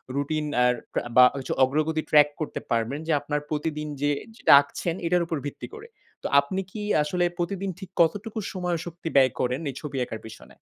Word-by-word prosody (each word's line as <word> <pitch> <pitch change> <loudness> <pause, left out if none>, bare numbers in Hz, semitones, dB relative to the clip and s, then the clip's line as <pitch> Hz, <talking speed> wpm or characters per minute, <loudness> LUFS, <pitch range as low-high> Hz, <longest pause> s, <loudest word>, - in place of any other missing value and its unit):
Routine 150 +2 -1 0.2
আর 125 0 +4 0.2
প্রা - - -1
বা 125 - +10
হচ্ছে 130 -2 -3
অগ্রগতি 155 +4 +1
ট্রাক 150 -1 +7
করতে 155 - -3
পারবেন 115 +5 0
যে - - +1
আপনার 150 0 -2
প্রতিদিন 150 0 -2
যে 145 - +2 0.3
যেটা - - +2
আঁকছেন 165 +4 -4
এটার 175 0 +2
উপর 165 -1 -3
ভিত্তি 145 - -6
করে। 445 0 -10 0.4
তো - - -1
আপনি 165 +8 -2
কি 215 - -6 0.2
আসলে 175 +4 0
প্রতিদিন 190 +3 -2
ঠিক 190 -2 -9
কতটুকু 205 +7 0
সময়, 180 -2 -2
শক্তি 170 0 -8
ব্যয় 130 -2 +6
করেন 125 +1 0
এই 135 - -7
ছবি 145 -3 -5
আঁকার 110 - -7
পেছনে? 110 0 -12
155 Hz, 190 wpm, -25 LUFS, 140-175 Hz, 0.4 s, বা